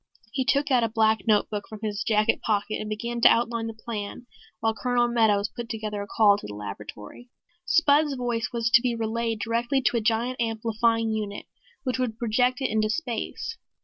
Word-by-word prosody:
He 265 - 0
took 280 +3 +1
out 250 -2 +4
a 230 - +1
black 220 0 +2
notebook 210 -1 +1
from 215 -2 -9
his 210 0 -2
jacket 215 -1 +2
pocket 215 -1 -1
and 215 - -5
began 235 +3 -3
to - - +8
outline 230 -1 +1
the 225 - -6
plan 220 +1 -5 0.3
while 225 0 +1
Colonel 240 +2 +1
Meadows 220 -3 +2
put 235 -1 -6
through 225 - -4 0.2
a 200 - -6
call 205 -2 +4
to - - -8
the 105 - -7
laboratory. 105 - -9 0.4
Spud's 305 -4 +4
voice 240 -3 -2
was 230 -1 -1
to 235 - +7
be 245 -2 0
relayed 225 -1 -2
directly 235 +5 0
to 240 - +2
a - - 0
giant 235 +3 0
amplifying 225 0 0
unit 210 -2 -4 0.4
which 255 -1 -2
would 235 -3 -1
project 250 +3 +1
it 265 - 0
into 215 0 +1
space. 250 - -3
230 Hz, 190 wpm, -26 LUFS, 215-240 Hz, 0.4 s, to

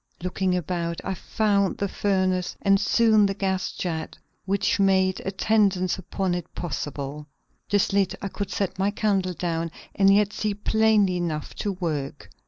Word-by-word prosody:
Looking 185 0 0
about, 170 -1 -3
I 190 - -2
found 200 +1 0
the 200 - -1
furnace 185 -2 0
and 195 -1 +4
soon 215 0 +4
the 195 - -2
gas 190 -2 -1
jet 160 -3 -4 0.3
which 200 +1 +1
made 190 -1 +3
attendance 195 -2 +1
upon 190 0 -2
it 175 -1 -5
possible. 145 -3 -5 0.4
This 205 -1 +2
lit, 195 -2 +2
I 200 - -4
could 200 0 -4
set 195 -2 -2
my 195 +1 +2
candle 195 -3 0
down, 165 -1 -2 0.2
and 195 0 +4
yet 205 0 +3
see 210 -2 -1
plainly 210 -3 +3
enough 160 -4 -3
to 205 - -2
work. 150 -6 -4
190 Hz, 155 wpm, -25 LUFS, 175-200 Hz, 0.4 s, and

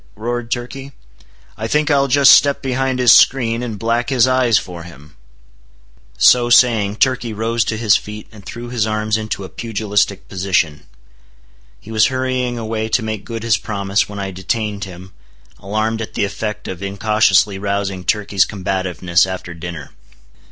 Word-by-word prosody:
roared 120 +2 -4
Turkey; 130 +3 -5 0.6
"I 110 - -3
think 150 +5 +1
I'll 140 -1 +3
just 140 0 +6
step 140 -1 +4
behind 130 0 -1
his 125 -2 +5
screen, 120 -3 +4
and 115 -4 -5
black 115 +3 -1
his 130 -2 +3
eyes 130 -3 +3
for 90 -4 -6
him!" 75 -3 -14 1.0
So 120 - +5
saying, 115 -5 +4
Turkey 120 -2 0
rose 115 +2 0
to 110 - -2
his 110 -3 +3
feet 105 0 -9
and 105 -3 -14
threw 120 +4 -8
his 115 -3 -1
arms 110 0 -1
into 110 -2 -4
a 95 - -8
pugilistic 105 -3 -2
position. 90 -6 -1 0.9
He 110 - -12
was 110 -1 +4
hurrying 130 -2 -2
away 110 -1 -3
to 110 - +1
make 110 -2 -4
good 115 -1 -6
his 115 -3 +2
promise, 100 -1 -1
when 100 - -8
I 100 -1 -4
detained 100 +2 -3
him, 95 0 -12 0.5
alarmed 110 +3 -2
at 110 - -7
the - - +1
effect 105 +1 -5
of 95 0 -6
incautiously 100 0 +2
rousing 100 -2 -3
Turkey's 100 +1 +1
combativeness 95 -3 0
after 95 -2 -6
dinner. 85 -3 -8
110 Hz, 160 wpm, -18 LUFS, 100-120 Hz, 1.0 s, just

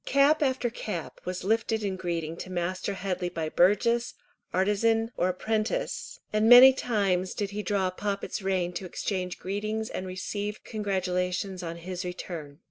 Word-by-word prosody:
Cap 280 +3 +4
after 260 -4 +1
cap 195 -8 -5
was 180 0 -4
lifted 220 +1 +1
in 195 -2 -1
greeting 170 -3 -3
to 185 - -7
Master 185 +2 -2
Headley 185 -2 -2
by 160 -2 -3
burgess, 220 +8 +3 0.4
artisan, 225 +4 +2
or 180 - +1
apprentice, 220 - -2
and 215 +1 +3
many 250 +2 +11
times 195 -8 0
did 205 -1 -2
he 210 +1 -3
draw 195 -3 0
Poppet's 200 +2 -3
rein 185 -2 0
to 190 - -4
exchange 180 -1 -3
greetings 215 +3 -3
and 185 - -4
receive 205 +3 -4
congratulations 185 -2 -2
on 170 -1 -5
his 180 +2 -5
return. 170 -5 -6
195 Hz, 150 wpm, -28 LUFS, 180-220 Hz, 0.4 s, many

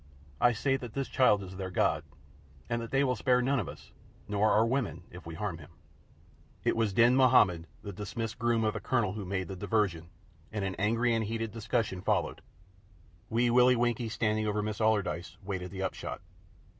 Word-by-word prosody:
I 120 - +5
say 135 +4 0
that 120 -4 -8
this 135 -1 -1
child 105 -6 +3
is 95 0 -9
their 95 -1 -4
God, 90 - +1 0.6
and 115 0 -1
that 115 - -6
they 135 +1 +2
will 130 -2 +1
spare 125 +2 +2
none 130 +2 +1
of 95 - -3
us, - - -12 0.4
nor 105 +1 +2
our 110 - +4
women, 120 -6 -1
if 90 -1 -11
we 85 - -6
harm 90 -2 -4
him." 70 - -13 0.9
It - - +2
was 115 -2 +1
Din 120 +5 +5
Mahommed, 115 -11 +4 0.2
the 100 - -6
dismissed 110 +4 -5
groom 120 -1 +2
of 110 -1 +1
the 105 - -4
Colonel, 105 -6 0
who 105 -2 -5
made 95 0 -2
the 95 - -6
diversion, 90 -5 -1 0.4
and 105 -2 -2
an 95 - -2
angry 115 +4 +2
and 115 -1 +1
heated 115 0 -3
discussion 110 -3 -2
followed. - - 0 0.9
Wee 120 +1 +2
Willie 125 +1 +6
Winkie 120 -1 0
standing 110 -1 0
over 105 0 0
Miss 105 0 -3
Allardyce, 105 -5 0
waited 95 -2 -4
the 95 0 -5
upshot. 95 - -4
110 Hz, 195 wpm, -30 LUFS, 95-120 Hz, 0.9 s, Willie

